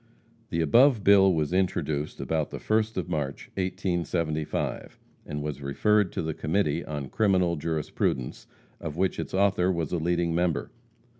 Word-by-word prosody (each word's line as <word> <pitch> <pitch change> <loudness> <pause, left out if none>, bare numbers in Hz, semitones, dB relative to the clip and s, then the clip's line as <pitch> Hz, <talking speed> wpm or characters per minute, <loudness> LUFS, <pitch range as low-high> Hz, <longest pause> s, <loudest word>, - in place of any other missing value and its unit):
The 85 - 0
above 115 - +5
bill 95 -1 +6
was 80 -1 0
introduced 80 -5 -1
about 80 -2 -1
the - - -6
first 110 0 0
of 90 - -2
March, 75 -5 -3
1875, 85 -4 -2 0.3
and 75 -1 -4
was 75 -1 -4
referred 100 +8 +2
to - - -2
the 80 0 -2
Committee 80 0 0
on 75 -3 -5
Criminal 90 -2 +2
Jurisprudence, 75 -5 -2 0.3
of 75 +1 -6
which 95 +1 0
its - - -4
author 95 -2 +3
was 85 -4 -2
a 90 - 0
leading 85 0 0
member. 85 -3 0
85 Hz, 150 wpm, -27 LUFS, 75-95 Hz, 0.3 s, bill